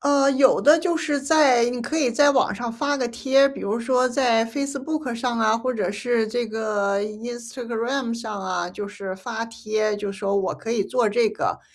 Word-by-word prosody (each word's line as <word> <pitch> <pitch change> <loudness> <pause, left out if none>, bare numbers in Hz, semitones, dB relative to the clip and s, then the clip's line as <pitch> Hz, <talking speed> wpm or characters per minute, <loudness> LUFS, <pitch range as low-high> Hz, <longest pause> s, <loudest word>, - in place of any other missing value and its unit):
呃， 280 -1 +3
有 265 0 +4
的 300 +3 +6
就 345 -2 0
是 300 -3 -1
在 275 -4 +4
你 245 0 -4
可 240 +7 -3
以 275 -6 +2
在 285 +4 +4
网 270 - +2
上 240 -1 -4
发 285 +5 -1
个 255 -3 -1
贴， 265 +3 +3
比 275 - -8
如 215 +3 -2
说 255 +1 +2
在 245 -3 +2
Facebook 280 +2 -4
上 235 0 -2
啊， 220 0 +3
或 255 +2 -2
者 205 -5 -2
是 225 +2 0
这 240 +2 -2
个 210 -2 -1
Instagram 235 +3 -4
上 220 -4 -5
啊。 180 -2 -2
就 200 +3 -7
是 200 -2 -7
发 225 +4 -5
帖， 215 -2 -2
就 205 -1 -4
说 200 0 -2
我 195 - 0
可 230 - -5
以 220 - +1
做 245 -1 +1
这 225 +1 +2
个。 215 - -3
235 Hz, 290 characters per minute, -23 LUFS, 215-265 Hz, -, 的